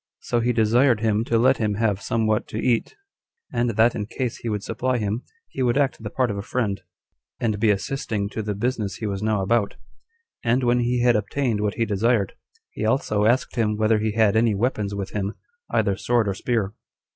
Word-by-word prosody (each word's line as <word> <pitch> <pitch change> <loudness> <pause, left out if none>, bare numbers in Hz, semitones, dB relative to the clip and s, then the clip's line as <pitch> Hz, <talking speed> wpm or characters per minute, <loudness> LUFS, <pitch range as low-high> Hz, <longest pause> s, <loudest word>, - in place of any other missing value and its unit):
So 120 - 0
he 120 +1 +1
desired 115 +1 +3
him 110 -1 +2
to 115 - +1
let 130 +3 +4
him 105 -3 0
have 105 -2 0
somewhat 110 0 0
to - - -6
eat; 115 0 0 0.6
and 120 0 +1
that 115 +2 +3
in 105 -1 -4
case 125 0 -3
he 115 - -5
would 105 -2 -2
supply 125 +3 -1
him, 105 +1 -2 0.3
he 135 - -5
would 125 0 +2
act 140 -5 +1
the 105 - -5
part 125 -1 0
of 100 - -4
a - - -2
friend, 100 -3 -2 0.6
and 110 -3 0
be 110 0 +3
assisting 105 -1 -1
to 110 - -4
the 105 -1 -3
business 110 -2 -2
he 110 - -5
was 100 -2 -3
now 105 -2 +1
about: 105 +1 +1 0.7
and 120 +2 +2
when 120 0 +3
he 120 0 +1
had 120 -1 +4
obtained 115 0 0
what 105 -1 -1
he 115 - +1
desired, 105 0 +1 0.4
he - - -5
also 110 -2 +1
asked 125 +2 +1
him 105 -2 +1
whether 110 0 +3
he 110 0 -1
had 110 -2 +3
any 110 -1 +3
weapons 105 -2 -1
with 100 -1 -4
him, 100 0 -3 0.3
either 100 -3 +1
sword 110 +3 +1
or 100 - 0
spear. 105 -1 -1
110 Hz, 210 wpm, -23 LUFS, 105-120 Hz, 0.7 s, let